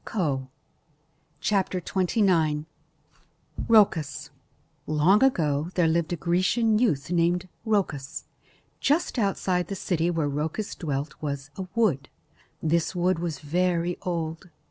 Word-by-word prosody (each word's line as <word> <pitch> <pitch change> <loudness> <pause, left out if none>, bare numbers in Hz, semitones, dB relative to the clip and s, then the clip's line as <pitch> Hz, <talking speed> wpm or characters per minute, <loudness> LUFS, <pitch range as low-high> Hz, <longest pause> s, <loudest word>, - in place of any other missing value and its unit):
COE 140 -10 -1 1.0
Long 185 -4 +1 2.4
ago 170 - +3
there 175 -3 +3
lived 165 +1 +1
a - - +1
Grecian 185 +7 +2
youth 160 - +1
named 175 +1 +1 0.2
Rhoecus. 170 -10 -1 0.6
Just 290 -2 +1
outside 185 -4 0
the 195 - -4
city 175 -2 0
where 165 -4 0
Rhoecus 155 +8 -3
dwelt 145 -2 -3
was 140 -1 -4
a 190 -1 -5
wood. 170 - +1 0.5
This 165 +3 +1
wood 180 0 +1
was 165 -4 -3
very 175 +2 0
old. 165 0 -4
175 Hz, 100 wpm, -26 LUFS, 155-190 Hz, 2.4 s, ago